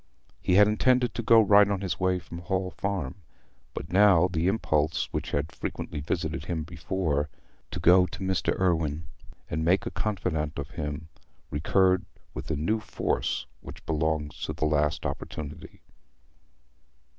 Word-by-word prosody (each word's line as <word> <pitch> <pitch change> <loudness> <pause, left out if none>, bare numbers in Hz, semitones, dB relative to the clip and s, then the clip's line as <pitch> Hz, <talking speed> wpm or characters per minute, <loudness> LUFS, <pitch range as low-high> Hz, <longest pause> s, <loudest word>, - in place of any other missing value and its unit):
He 90 - +2
had 105 +1 +7
intended 125 +2 +2
to - - -3
go 115 0 +6
right 100 -1 +6
on 100 -2 -1
his 90 -3 -2
way 95 0 +2
from 85 -1 -9
the 85 - -9
Hall 95 -2 -1
Farm, 95 -9 -3 0.6
but 80 - -6
now 95 -3 +6
the 85 -1 -1
impulse 80 -6 +1
which - - -2
had 75 +3 -1
frequently 75 - -5
visited 80 +2 -3
him 85 -3 -2
before—to 80 -2 -4
go 90 +1 +6
to 95 - -9
Mr. 95 -1 0
Irwine, 80 -4 +1 0.4
and 80 +2 -2
make 95 +8 +2
a 115 - -3
confidant 90 -7 -2
of 70 0 -5
him—recurred 80 +4 -1 0.3
with - - -6
the 80 - -1
new 95 +10 0
force 110 - -2
which - - -11
belongs 80 -1 -1
to - - -4
a - - +1
last 75 -1 +1
opportunity. 75 -1 -6
85 Hz, 150 wpm, -27 LUFS, 75-95 Hz, 0.6 s, had